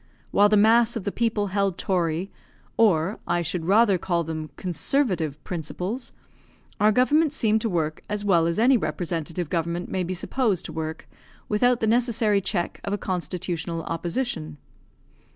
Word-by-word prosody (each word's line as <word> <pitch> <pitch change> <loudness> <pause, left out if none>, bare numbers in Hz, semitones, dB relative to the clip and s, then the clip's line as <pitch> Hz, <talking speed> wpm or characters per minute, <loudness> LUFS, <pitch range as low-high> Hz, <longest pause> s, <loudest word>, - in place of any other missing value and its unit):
While 205 +1 +5
the 210 - +4
mass 230 +3 +4
of 225 - -3
the 200 - -2
people 220 -3 0
held 200 -3 +1
tory, 175 0 -1 0.4
or, 195 -3 +2
I 175 0 +1
should 165 0 -3
rather 200 0 +4
call 170 -1 0
them, 155 -1 -5
conservative 180 - 0
principles, 180 - -4 0.7
our 210 +1 +5
government 290 +6 +3
seemed 220 -7 +2
to 225 - -1
work 160 -4 -2
as 205 0 -3
well 170 -4 +3
as 170 - -1
any 250 +4 +5
representative 165 -1 -3
government 170 +1 -2
may 185 - -1
be 185 +1 -3
supposed 210 0 0
to 160 - -7
work 160 0 -5 0.4
without 245 +3 +2
the - - +2
necessary 225 -3 +2
check 185 -2 -2
of 200 - -3
a - - 0
constitutional 170 -2 -3
opposition. 165 - -3
185 Hz, 155 wpm, -25 LUFS, 170-220 Hz, 0.7 s, While